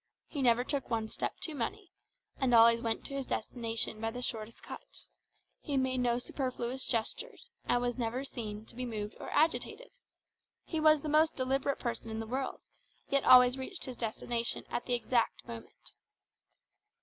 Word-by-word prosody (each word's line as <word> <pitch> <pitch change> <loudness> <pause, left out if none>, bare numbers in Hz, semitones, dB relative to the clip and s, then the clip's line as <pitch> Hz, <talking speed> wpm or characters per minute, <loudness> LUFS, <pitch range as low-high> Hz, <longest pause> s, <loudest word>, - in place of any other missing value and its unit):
He 285 - -4
never 245 -1 +4
took 280 +1 -2
one 225 -2 -1
step - - -3
too 320 - 0
many, 365 - -4 0.5
and 255 -3 +3
always 230 0 +7
went 225 -1 -1
to - - -3
his 275 -1 -3
destination 225 -1 -2
by 225 - 0
the 245 +2 -5
shortest 225 -1 -4
cut; - - -7 0.8
he 280 - -2
made 260 -1 +1
no 240 -1 +2
superfluous 255 0 -3
gestures, 245 - -2
and 245 - +2
was 245 +1 -1
never 240 +3 -1
seen 220 -5 -6
to - - -15
be 250 +2 -4
moved 215 -4 -4
or - - -6
agitated. 330 +10 +1 0.7
He 320 - -3
was 310 -1 +6
the - - -3
most 310 +1 +4
deliberate 270 +1 0
person 235 -2 -3
in 220 0 -3
the 225 - -3
world, 260 +4 -3 0.5
yet 275 0 +2
always 250 0 +8
reached 335 +8 -3
his 255 - -5
destination 230 +1 -1
at - - -2
the 245 - +2
exact 240 -1 0
moment. 115 - -10
245 Hz, 175 wpm, -32 LUFS, 230-270 Hz, 0.8 s, always